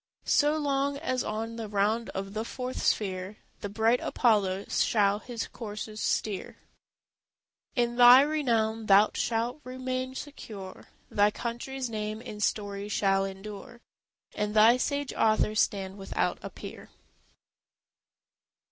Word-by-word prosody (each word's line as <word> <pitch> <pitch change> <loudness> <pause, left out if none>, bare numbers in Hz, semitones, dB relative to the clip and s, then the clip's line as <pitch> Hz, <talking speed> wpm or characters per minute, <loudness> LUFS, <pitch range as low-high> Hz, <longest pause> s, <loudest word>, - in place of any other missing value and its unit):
So 300 +1 +3
long 280 -1 0
as 255 -4 -1
on 225 +2 -4
the 225 -1 -4
round 210 +3 0
of 195 +1 -4
the 215 +1 -2
fourth 255 +2 -5
sphere 190 0 -1 0.2
The 205 - -5
bright 225 +4 +2
Apollo 200 -5 +1
shall 205 -2 +2
his 235 0 -5
coursers 215 -1 -7
steer, 205 -3 -2 1.2
In 240 -2 0
thy 245 +1 +9
renown 230 -7 0
thou 200 +2 +6
shalt 235 +5 -1
remain 255 0 -4
secure, 210 -10 -9 0.2
Thy 205 0 +4
country's 245 +4 -4
name 215 -1 -4
in 210 -2 -8
story 205 -1 -2
shall 195 -2 +2
endure, 205 +5 -8 0.5
And 210 0 -2
thy 225 +3 +7
sage 285 +1 -2
author 215 -1 +2
stand 195 -2 0
without 195 - -1
a - - -6
peer. - - -10
220 Hz, 125 wpm, -28 LUFS, 205-250 Hz, 1.2 s, thy